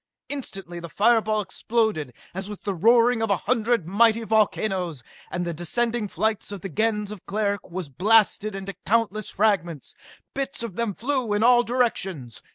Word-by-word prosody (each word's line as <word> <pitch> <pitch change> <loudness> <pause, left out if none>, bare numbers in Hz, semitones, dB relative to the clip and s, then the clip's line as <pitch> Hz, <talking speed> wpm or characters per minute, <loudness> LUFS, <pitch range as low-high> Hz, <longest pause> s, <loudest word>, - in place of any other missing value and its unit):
Instantly 195 -11 -6
the 170 0 -8
fire 225 +6 +4
ball 215 0 0
exploded 210 - -1 0.2
as 190 +3 -5
with 210 - -8
the 200 - -1
roaring 230 +5 +4
of 225 - 0
a 200 - +3
hundred 235 -4 0
mighty 225 +4 +3
volcanoes 190 - 0 0.3
and 175 -1 -3
the 170 - -2
descending 225 +7 -1
flight 220 0 -1
of 200 -3 -6
the 195 - -5
Gens 210 +3 0
of 210 -4 -9
Cleric 205 -2 -1
was 180 -2 -5
blasted 210 - +2
into 195 0 -5
countless 215 -1 0
fragments! 175 - 0 0.4
Bits 275 -3 -3
of 220 -6 -6
them 230 -4 -1
flew 255 -3 -1
in 205 +1 +1
all 240 0 +6
directions. 195 - -2
210 Hz, 165 wpm, -24 LUFS, 190-230 Hz, 0.4 s, all